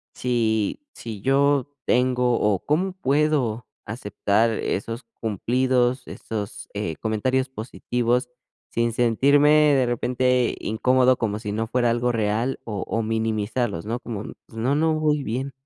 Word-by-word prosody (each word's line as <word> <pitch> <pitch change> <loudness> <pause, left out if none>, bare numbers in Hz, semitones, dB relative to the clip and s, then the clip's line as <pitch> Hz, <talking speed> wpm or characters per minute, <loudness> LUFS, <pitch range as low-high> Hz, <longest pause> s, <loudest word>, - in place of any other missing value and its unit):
si 110 - 0
si 110 -3 -7
yo 140 +1 +2
tengo 125 -1 +2
o, 105 -3 +2
¿cómo 180 +5 +1
puedo 140 - 0 0.2
aceptar 110 0 0
esos 115 +3 -3 0.2
cumplidos, 125 +3 0
esos, 105 -2 -6
eh, 100 -6 -3
comentarios 130 +4 0
positivos? 125 +1 -1 0.4
Sin 115 -1 0
sentirme 140 +5 +4 0.3
de 130 -2 +3
repente 125 +1 +1
incómodo 125 +3 +3
como 105 -2 -1
si 105 -2 -5
no 110 +2 -2
fuera 120 0 +1
algo 120 +1 +1
real 110 +4 0
o 105 -5 -4
o 115 - -1
minimizarlos, 110 -2 -1
¿no? 115 +3 -2
Como, 110 -4 -6 0.2
pues, 115 - -15
no 125 +5 +1
no 160 +2 +2
voy 150 -2 +1
bien, 130 +4 -3
120 Hz, 135 wpm, -24 LUFS, 110-130 Hz, 0.4 s, sentirme